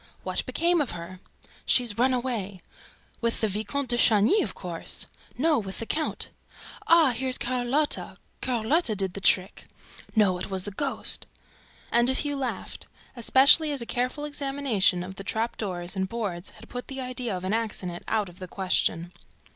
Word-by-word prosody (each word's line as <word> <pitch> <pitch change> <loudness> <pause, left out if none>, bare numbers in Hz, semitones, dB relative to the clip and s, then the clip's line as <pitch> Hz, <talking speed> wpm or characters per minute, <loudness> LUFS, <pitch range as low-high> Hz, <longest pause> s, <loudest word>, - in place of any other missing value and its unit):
"What - - -1
became 345 0 +2
of 280 - -2
her?" 175 +2 -9 0.4
"She's 240 -5 +3
run 255 +4 +3
away." 235 -7 -2 0.6
"With 230 -1 0
the 220 - +2
Vicomte 220 +7 -2
de 240 - +1
Chagny, 225 - +5
of - - -3
course!" - - -1 0.3
"No, 305 +2 +3
with 195 -3 -5
the 230 - -3
count!" 310 +6 -1 0.6
"Ah, 330 -5 +6
here's 255 +2 0
Carlotta! 255 +4 -1 0.2
Carlotta 250 +1 +1
did 190 -2 -1
the 200 - -7
trick!" 185 +1 +2 0.5
"No, 195 -5 +3
it - - -5
was 190 -1 -1
the 205 - -5
ghost!" 275 +7 -3 0.6
And 240 +1 +4
a 260 - +2
few 290 +1 0
laughed, 265 -3 -4 0.3
especially 275 +6 +6
as 275 -4 -1
a - - -8
careful 255 +5 -2
examination 270 -11 +1
of 190 +1 -8
the 195 - -6
trap 220 +4 -1
doors 180 -3 -3
and 190 0 -1
boards 200 -6 -4
had - - -14
put 245 0 -6
the 270 -1 -6
idea 250 -5 -2
of 180 - -8
an 190 +2 -1
accident 200 -6 -3
out 215 -2 0
of 175 +1 -13
the 185 - -6
question. 175 -2 0
230 Hz, 170 wpm, -27 LUFS, 195-265 Hz, 0.6 s, Ah